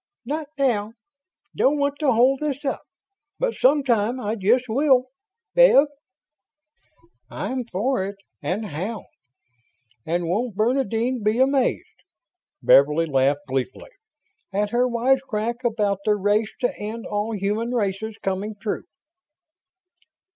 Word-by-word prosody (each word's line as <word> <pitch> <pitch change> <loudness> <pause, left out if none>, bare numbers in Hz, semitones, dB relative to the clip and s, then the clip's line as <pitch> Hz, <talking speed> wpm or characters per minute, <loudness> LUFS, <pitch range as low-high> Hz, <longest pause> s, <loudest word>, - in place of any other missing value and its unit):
"Not 300 +4 -3
now 225 -6 0 0.6
don't 290 +3 +3
want 285 0 -1
to 295 -4 +3
hold 255 +3 +3
this 295 -1 -3
up 270 - -1 0.6
but - - 0
sometime 255 -4 +2
I 215 -3 -2
just 230 +5 +2
will. 255 +1 +3 0.4
Bev?" - - +7 1.4
"I'm 255 -1 -4
for 215 -1 -1
it 200 - -7 0.3
and 205 +5 -2
how! 200 +6 -5 1.0
And 170 +3 -1
won't 215 +5 -1
Bernadine 240 +1 0
be 215 +2 +1
amazed," 265 0 +1 0.6
Beverly 150 +4 +5
laughed 140 0 +1
gleefully, 130 - -4 0.6
"at 205 +1 -1
her 245 +1 +2
wise 250 +2 +2
crack 235 -2 -3
about 210 -4 0
the 210 - +2
'race 205 +2 +1
to 245 - 0
end 220 +2 -5
all 210 +2 -2
human 210 +4 -1
races' 220 -2 -2
coming 195 +3 -2
true?" 210 0 -3
225 Hz, 120 wpm, -23 LUFS, 205-260 Hz, 1.4 s, Bev